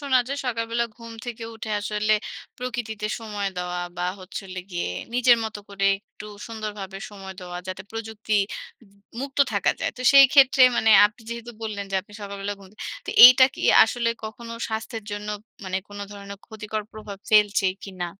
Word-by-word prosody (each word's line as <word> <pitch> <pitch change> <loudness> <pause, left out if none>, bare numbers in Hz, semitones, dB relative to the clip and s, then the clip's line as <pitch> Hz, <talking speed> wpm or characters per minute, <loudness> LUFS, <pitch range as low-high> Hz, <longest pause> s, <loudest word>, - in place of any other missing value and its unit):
শোনা 275 -3 +3
যায় 280 - -3
সকালবেলা 230 0 -1
ঘুম 230 -1 -10
থেকে 230 -1 -6
উঠে 220 -1 -7
আসলে 210 +1 0 0.4
প্রকৃতিতে 230 -4 -4
সময় 205 -3 -3
দেওয়া 180 0 -3 0.2
বা, 175 - -2 0.2
হচ্ছে 185 +2 -7
হলো 185 0 -6
গিয়ে 175 - -2 0.3
নিজের 245 -1 +5
মতো 220 -1 -5
করে 200 0 -3
একটু 210 - -13 0.2
সুন্দরভাবে 210 -4 -6
সময় 195 -2 -9
দেওয়া। 180 0 -7
যাতে 185 +1 -5
প্রযুক্তি 220 -1 -4 0.5
উবু 200 -2 -23 0.2
মুক্ত 275 +1 -5
থাকা - - +2
যায়। - - 0
তো 250 - -6
সেইক্ষেত্রে 275 -1 +7
মানে 220 - +3 0.2
আপনি 210 +3 -14
যেহেতু 235 0 -6
বললেন 205 -2 -4
যে, - - -3
আপনি 205 +2 -20
সকালবেলা 200 0 -5
ঘুম 190 - -14
থে - - -24 0.3
তো - - -2
এইটা 255 +1 +10
কি - - -9 0.2
আসলে 230 +1 -1 0.2
কখনো 230 +2 -8 0.2
স্বাস্থ্যের 220 0 -5
জন্য 205 0 -5 0.4
মানে 185 0 -2
কোন 205 0 -10
ধরনের 200 -1 -9
ক্ষতিকর 215 -1 -5
প্রভাব 210 -2 -9
ফেলছে 210 -2 +4 0.2
কিনা? 185 -3 -5
215 Hz, 170 wpm, -24 LUFS, 200-230 Hz, 0.5 s, এইটা